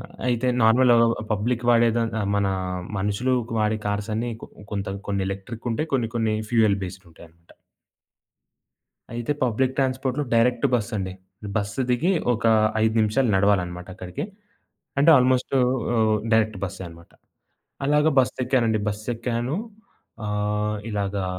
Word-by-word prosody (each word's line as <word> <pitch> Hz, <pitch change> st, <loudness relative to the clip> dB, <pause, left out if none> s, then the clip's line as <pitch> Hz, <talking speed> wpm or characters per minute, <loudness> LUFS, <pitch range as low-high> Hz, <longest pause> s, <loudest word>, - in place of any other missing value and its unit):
అ -, -, -7 dB
ఆహ్, -, -, -14 dB, 0.2 s
అయితే 125 Hz, +1 st, +1 dB
నార్మల్‌గ 120 Hz, +2 st, +5 dB, 0.4 s
పబ్లిక్ 120 Hz, +4 st, -1 dB
వాడే 120 Hz, 0 st, +5 dB
దాన్ 115 Hz, -1 st, 0 dB, 0.2 s
మన 100 Hz, -, +1 dB, 0.5 s
మనుషులు 105 Hz, +6 st, 0 dB, 0.2 s
వాడే 110 Hz, 0 st, +1 dB
కార్స్ 105 Hz, +1 st, -2 dB
అన్ని 120 Hz, +2 st, -2 dB
కొ -, -, -7 dB, 0.3 s
కొంత 100 Hz, -1 st, -3 dB, 0.2 s
కొన్ని 100 Hz, -1 st, 0 dB
ఎలక్ట్రిక్ 100 Hz, +5 st, -7 dB
ఉంటాయి 155 Hz, +7 st, -3 dB
కొన్ని 120 Hz, -4 st, +1 dB
కొన్ని 110 Hz, -2 st, +1 dB, 0.2 s
ఫ్యూయల్ 110 Hz, -4 st, +3 dB
బేస్డ్ 95 Hz, +1 st, -9 dB
ఉంటాయన్నమాట. 85 Hz, +1 st, -18 dB, 1.6 s
అయితే 120 Hz, +4 st, -3 dB
పబ్లిక్ 130 Hz, +2 st, +1 dB
ట్రాన్స్‌పోర్ట్‌లో 130 Hz, +1 st, 0 dB
డైరెక్ట్ 120 Hz, +3 st, +3 dB
బస్ 115 Hz, -2 st, -2 dB
అండి. 95 Hz, -1 st, -3 dB, 0.4 s
బస్సు 105 Hz, +4 st, -1 dB
దిగి 130 Hz, +10 st, +2 dB, 0.2 s
ఒక 110 Hz, 0 st, -3 dB, 0.4 s
5 110 Hz, 0 st, +2 dB
నిమిషాలు 110 Hz, +3 st, +2 dB
నడవాలనమాట 90 Hz, -3 st, +1 dB
అక్కడికి. 90 Hz, -1 st, -6 dB, 0.8 s
అంటే 145 Hz, +4 st, +5 dB
ఆల్‌మోస్ట్ 130 Hz, +1 st, +2 dB
ఆహ్, 120 Hz, -3 st, +2 dB, 0.2 s
డైరెక్ట్ 110 Hz, -2 st, +2 dB
బస్సే 95 Hz, 0 st, -5 dB
అనమాట. 85 Hz, 0 st, -15 dB, 0.7 s
అలాగ 150 Hz, +1 st, +3 dB
బస్సు 130 Hz, -, +2 dB
ఎక్కానండి 115 Hz, -4 st, +2 dB
బస్సేక్కాను 120 Hz, +5 st, -3 dB, 0.7 s
ఆహ్, 105 Hz, +1 st, -1 dB
ఇలాగా 100 Hz, -2 st, -2 dB
110 Hz, 130 wpm, -24 LUFS, 100-125 Hz, 1.6 s, నార్మల్‌గ